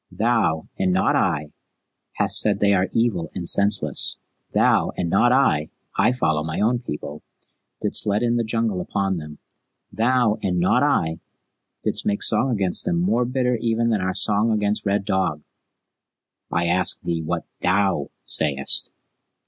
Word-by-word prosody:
Thou, 110 -9 0
and 95 -1 +1
not 95 +1 +1
I, 75 -5 0 0.6
hast - - +2
said - - +2
that - - -12
they 100 - +4
are 95 0 +1
evil 115 -8 0
and 85 -2 -5
senseless. 100 0 +3 0.3
Thou, - - +2
and 85 -2 -2
not 120 - +3
I 80 - +2 0.3
I 120 - +3
follow 80 -12 0
my 80 0 -4
own 120 +4 +1
people 75 - -7 0.6
didst - - 0
let 105 +3 +1
in 120 0 +1
the 120 - 0
Jungle 110 -4 -1
upon 95 +1 -2
them. 75 -2 -9 0.5
Thou, 115 -1 +1
and 90 -2 -1
not 90 +8 +2
I, 80 - 0 0.6
didst - - -2
make 100 0 -1
song 115 +5 +2
against 100 -7 0
them 175 -2 -1
more 125 -9 +1
bitter 125 -1 0
even 115 0 0
than 110 -4 0
our 95 0 -2
song 105 +2 +2
against 105 -1 -1
Red 100 0 0
Dog." 95 -7 -1 1.1
"I 85 0 0
ask 90 +1 +2
thee 85 -1 -3
what 85 +1 -3 0.2
THOU 95 -5 +1 0.2
sayest?" 70 -3 +3
100 Hz, 160 wpm, -22 LUFS, 85-115 Hz, 1.1 s, they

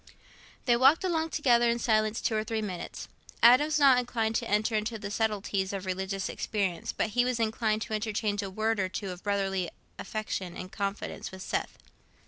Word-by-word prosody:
They 240 - +4
walked 270 +8 +5
along 325 -3 0
together 240 -6 +3
in 235 - +1
silence 215 -2 +1
two 220 - 0
or 215 - +1
three 220 -1 -2
minutes. 185 -4 -6 0.4
Adam 250 +5 +8
was 310 0 0
not 275 -4 +6
inclined 230 -3 -1
to 235 - -4
enter 210 +2 +1
into 215 +1 -1
the 205 -1 -6
subtleties 205 -3 -1
of 195 -1 -4
religious 190 +1 -2
experience, 195 -5 -2
but - - -1
he 245 +3 +3
was 250 -1 -1
inclined 220 -1 0
to - - -6
interchange 210 -1 -1
a 200 - -4
word 220 +2 0
or 190 -1 0
two 195 +1 -4
of 180 0 -9
brotherly 195 -3 -1 0.3
affection 195 -5 -4
and 185 +1 -7
confidence 200 0 -4
with 190 0 -8
Seth. - - -3
215 Hz, 190 wpm, -29 LUFS, 195-235 Hz, 0.4 s, Adam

